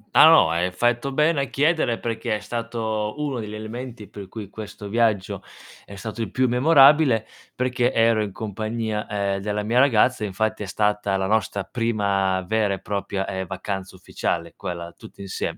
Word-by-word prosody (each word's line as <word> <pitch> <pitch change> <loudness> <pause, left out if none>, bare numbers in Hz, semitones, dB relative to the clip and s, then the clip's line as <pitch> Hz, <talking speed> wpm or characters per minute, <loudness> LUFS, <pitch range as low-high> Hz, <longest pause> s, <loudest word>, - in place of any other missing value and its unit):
Ah - - +9
no, - - +6
hai 85 +2 +1
fatto 120 +7 0
bene 150 +1 +2
a - - 0
chiedere 145 -4 +1
perché 115 -2 -2
è - - -3
stato 110 -2 -3
uno 145 -4 -2
degli 105 -1 -6
elementi 110 0 -7
per 100 0 -10
cui 105 +1 -8
questo 105 0 -9
viaggio 110 -3 0 0.4
è 100 - -11
stato 110 +3 -6
il 110 - -2
più 130 +6 +1
memorabile, 135 -2 +5 0.3
perché 125 0 +1
ero 115 -2 +3
in 105 -2 -3
compagnia, 110 +1 -3
ehm, 100 -1 -1
della 105 +1 -2
mia 115 +4 +2
ragazza, 125 -3 +3
infatti 105 +2 -1
è - - -3
stata 105 0 0
la 95 - -1
nostra 100 -1 0
prima 100 -5 0
vera 105 +1 +1
e - - -10
propria, 100 -1 -3
ehm, 95 -1 -4
vacanza 95 0 -5
ufficiale 85 -2 -3
quella 85 -1 -6
tutti 110 -3 -13
insiem 95 -1 -4
110 Hz, 175 wpm, -23 LUFS, 100-120 Hz, 0.4 s, Ah